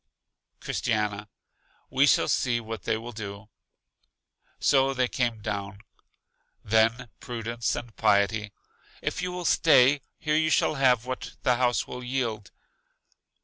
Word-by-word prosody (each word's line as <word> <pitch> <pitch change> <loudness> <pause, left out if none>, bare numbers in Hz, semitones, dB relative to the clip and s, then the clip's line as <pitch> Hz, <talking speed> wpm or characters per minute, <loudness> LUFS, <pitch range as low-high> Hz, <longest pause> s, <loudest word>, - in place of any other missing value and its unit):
Christiana: 105 -1 -2 0.6
We 135 +2 +4
shall - - +4
see 120 -2 +1
what 110 -3 -7
they 110 - +1
will 115 +2 -8
do. 105 -1 -8 1.1
So 135 0 +3
they 125 -1 +1
came 120 -4 -2
down. 100 -1 -4 0.8
Then 115 +3 +2
Prudence 115 -3 -3
and 120 -2 -7
Piety: 105 0 +2 0.5
If - - -2
you 180 - -2
will 180 -1 -5
stay, 140 -4 +5 0.2
here 150 - -2
you 155 0 +2
shall 155 - +2
have 125 -4 +3
what 130 0 -6
the 125 -1 +3
house 125 -1 +1
will 125 0 -8
yield. 120 -5 -3
120 Hz, 130 wpm, -27 LUFS, 110-130 Hz, 1.1 s, stay